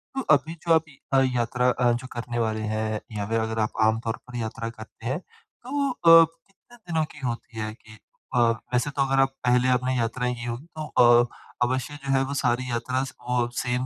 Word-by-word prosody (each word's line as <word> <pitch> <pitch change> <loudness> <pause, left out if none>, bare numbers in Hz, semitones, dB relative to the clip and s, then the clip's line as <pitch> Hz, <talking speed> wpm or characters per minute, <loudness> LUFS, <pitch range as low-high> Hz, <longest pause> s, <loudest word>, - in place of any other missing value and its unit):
तो 270 - 0
अभी 155 +3 -3
जो 165 - +6
आप 160 -1 +4
य 140 - -18 0.2
अ, 135 - +6
यात्रा 125 +1 +1
अ, 125 -1 +2
जो 125 +2 -4
करने 120 0 -4
वाले 110 -1 0
हैं 110 0 -1
या 105 -1 -3
फिर 115 0 +1
अगर 110 0 -2
आप 110 - +1
आम 110 +1 +3
तौर 115 - -1
पर 125 - -10
यात्रा 115 0 -4
करते 110 0 -13
हैं। 130 +6 -1
तो 275 +8 -5
अ, 165 -7 +7 0.2
कितने 220 +5 -21
दिनों 170 -7 -1
की 150 - -13
होती 115 -1 -5
है 110 0 -3
कि 110 0 -16 0.4
अ, 125 - +4 0.3
वैसे 125 +4 +2
तो 140 - -2
अगर 135 0 +1
आप 135 - +3
पहले 125 +1 +3
आपने 130 +1 -1
यात्राएँ 125 +1 -1
की 120 -1 -7
होगी 120 +5 -5
तो 125 -7 +4
अ, - - -2 0.4
अवश्य 130 +3 -1
जो 135 - -2
है 135 0 +3
वो 140 - -4
सारी 130 -2 0
यात्रा 125 +2 -1
स 130 -1 -7 0.2
वो 125 -1 +2
सेम 125 +1 -1
125 Hz, 220 wpm, -25 LUFS, 115-135 Hz, 0.4 s, अ